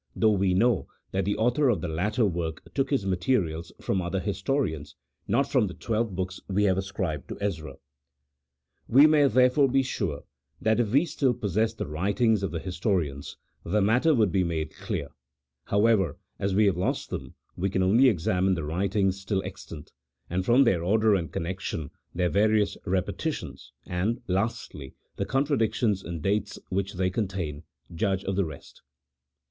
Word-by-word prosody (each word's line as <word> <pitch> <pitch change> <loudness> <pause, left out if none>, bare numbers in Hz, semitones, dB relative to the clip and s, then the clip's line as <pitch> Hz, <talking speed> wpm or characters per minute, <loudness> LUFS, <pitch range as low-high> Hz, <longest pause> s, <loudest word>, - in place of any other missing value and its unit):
though 110 - +4
we 95 -2 +2
know 115 +1 +2 0.2
that 95 -1 0
the 100 - 0
author 125 +5 +2
of 115 - +2
the 90 - -3
latter 105 +9 0
work 85 -4 -3
took 135 -2 0
his 135 -9 0
materials 90 -4 0
from 95 - -1
other 90 +2 -2
historians, 100 - -2 0.3
not 140 0 +2
from 130 -7 +2
the 90 - -7
twelve 110 -3 -2
hooks 95 +1 -3
we 100 +1 +1
have 95 -2 +3
ascribed 95 - -3
to - - -6
Ezra. 80 -9 -3 1.1
We 135 +5 +7
may 150 -2 +5
therefore 130 +3 +4
he 135 +1 +3
sure 95 - -3 0.4
that 110 +1 +2
if 115 -3 +1
we 140 +7 +4
still 135 -7 0
possessed 110 +1 0
the - - -3
writings 100 - +1
of 95 - -1
the 85 - -4
historians, 85 -6 -2 0.3
the 100 +6 +1
matter 125 +10 +3
would 110 -6 +3
"be 95 +1 +2
made 80 -3 -2
clear; 70 - -4 0.6
however, 100 - +2 0.2
as 95 -1 0
we 105 +1 +5
have 95 -4 +2
lost 90 - -2
them, - - -6 0.2
we 95 +2 -1
can 95 0 0
only 115 +8 +5
examine 95 -1 +1
the 85 - -4
writings 95 +4 0
still 95 -1 -1
extant, 90 -5 -9 0.4
and 95 +2 0
from 125 +5 +5
their 95 -9 +2
order 110 +3 +3
and 85 -5 -1
connection, 85 -3 -4 0.2
their 90 0 +2
various 105 0 +2
repetitions, 95 0 -3
and, 100 +7 -1
lastly, 90 - -3 0.2
the - - -1
contradictions 120 -7 +1
in 85 -2 -5
dates 100 +5 -1
which 100 +1 -2
they 90 0 0
contain, 90 -8 -3 0.3
judge 95 +2 0
of 95 - -2
the 100 -1 +1
rest. 75 -4 -11
95 Hz, 170 wpm, -27 LUFS, 90-110 Hz, 1.1 s, We